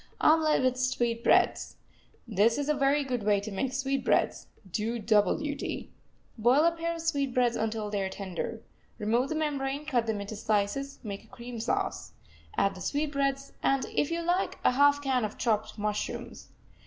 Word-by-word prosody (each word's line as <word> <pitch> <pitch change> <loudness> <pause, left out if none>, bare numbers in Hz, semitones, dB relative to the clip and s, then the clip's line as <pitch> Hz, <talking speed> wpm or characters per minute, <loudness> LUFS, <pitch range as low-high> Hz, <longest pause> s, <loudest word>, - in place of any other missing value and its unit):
OMELET 310 -3 +4
WITH 255 0 +2
SWEETBREADS 240 -2 +2 0.5
This 220 +1 +3
is 290 -1 -2
a - - +4
very 285 0 +2
good 250 -3 -2
way 205 -1 +3
to 210 +2 -6
make 255 +7 -1
sweetbreads 270 0 0 0.2
do 225 +5 -1
double 210 -3 +3
duty. 290 -2 -4 0.5
Boil 250 +7 +5
a 335 - +5
pair 335 0 -3
of 330 - -6
sweetbreads 270 -7 +1
until 220 -1 -2
they 205 -1 0
are 190 - -1
tender. 195 +3 -5 0.4
Remove 235 +5 +1
the 315 - -2
membrane, 285 -2 -2
cut 245 -6 0
them 220 -2 -1
into 200 +2 -6
slices; 215 +7 -1
make 205 -1 -6
a - - -21
cream 235 +1 -8
sauce. 220 - -2 0.4
Add 200 - +3
the 185 - -10
sweetbreads, 275 - -1
and, 270 -1 +2
if 290 - +1
you 335 0 -2
like, 355 +3 0
a - - +5
half 285 +2 +4
can 260 -3 +1
of 215 0 -4
chopped 220 -2 0
mushrooms. 210 0 -4
250 Hz, 170 wpm, -29 LUFS, 215-285 Hz, 0.5 s, Boil